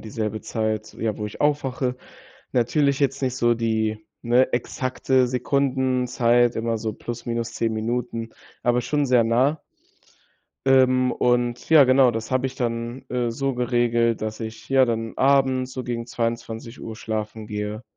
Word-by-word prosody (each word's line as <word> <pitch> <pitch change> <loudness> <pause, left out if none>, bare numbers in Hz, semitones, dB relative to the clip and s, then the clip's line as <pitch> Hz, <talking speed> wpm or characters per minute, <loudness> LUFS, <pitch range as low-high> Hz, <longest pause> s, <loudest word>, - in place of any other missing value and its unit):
dieselbe 110 -1 -4
Zeit, 110 -1 -3
ja, 110 -2 -2
wo 105 - -3
ich 105 - -6
aufwache. 135 -3 0 0.6
Natürlich 140 +3 +2
jetzt 135 0 +1
nicht 130 -2 -1
so 120 -2 +3
die, 110 -2 0 0.2
ne, 120 +2 +3
exakte 130 +1 0
Sekundenzeit, 125 -2 +1
immer 115 0 -1
so 110 -1 -3
plus 120 0 -7
minus 115 0 -2
10 115 -1 -1
Minuten, 115 0 -3 0.3
aber 120 0 +2
schon 145 +4 0
sehr 125 -3 +4
nah. 130 +7 +2 1.1
Ähm, 130 -1 +4
und 120 0 0
ja, 155 -3 +9
genau, 130 -1 +5
das 115 +2 -5
habe 130 0 +1
ich 130 - -6
dann, 120 +1 -3
äh, 120 -2 -1
so 135 +3 -1
geregelt, 120 -2 +1
dass 110 0 -4
ich, 110 0 -7
ja, 135 -1 +5
dann 115 -2 -2
abends 130 -1 +2
so 130 - -4
gegen 120 -1 -4
22:00 115 -1 -4
schlafen 110 0 -5
gehe 105 +1 -4
120 Hz, 150 wpm, -23 LUFS, 115-130 Hz, 1.1 s, ja